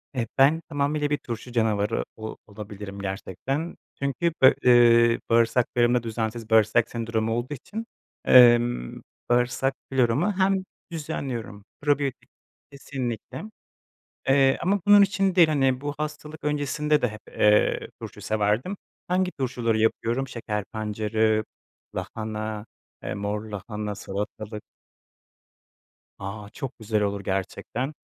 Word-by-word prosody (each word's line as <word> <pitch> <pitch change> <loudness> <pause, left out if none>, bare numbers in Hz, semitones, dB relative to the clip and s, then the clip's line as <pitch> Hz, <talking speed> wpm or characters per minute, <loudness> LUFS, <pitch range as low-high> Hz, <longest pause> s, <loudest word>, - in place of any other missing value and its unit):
E, 115 -3 -1
ben 145 +5 +5
tamamıyla 145 0 0
bir 145 - +1
turşu 120 +1 -7
canavarı 110 -2 +1
o 110 0 -7
olabilirim 105 -1 -8
gerçekten. 100 - -4 0.2
Çünkü 140 +5 -1
be 130 - +8
eee, 120 -1 +6
bağırsaklarımda 120 +1 +3
düzensiz 110 0 -3
bağırsak 110 +1 +4
sendromu 115 -1 -2
olduğu 120 +5 -2
için, 215 - -7 0.4
emm, 120 - +5 0.3
bağırsak 125 +2 +2 0.2
floramı 130 - +2
hem 190 0 +2 0.3
düzenliyorum 130 -10 -5 0.2
Probiyotik 145 -3 0 0.4
kesinlikle, 130 - -5 0.9
eee, 135 0 +4
ama 200 +3 +2
bunun 205 0 +8
için 195 -1 +2
değil, 170 -3 +6
hani, 135 -4 +2
bu 145 0 -3
hastalık 150 0 -6
öncesinde 150 0 +1
de 125 - +3
hep, 110 -1 -9
eee, 105 0 +3
turşu - - -8
severdim. 110 - 0 0.3
Hangi 185 +1 +1
turşuları 120 -4 0
yapıyorum? 115 +4 0
Şeker 105 -4 -4
pancarı, 110 0 0 0.5
lahana, 110 0 -4 0.4
eee, - - -4
mor 105 +1 -2
lahana, 105 0 -5
salatalık. 105 +2 -5 1.6
A, 100 +1 -6
çok 135 -2 -6
güzel 110 -1 0
olur 100 -1 -1
gerçekten. 95 - -3
120 Hz, 115 wpm, -25 LUFS, 110-140 Hz, 1.6 s, be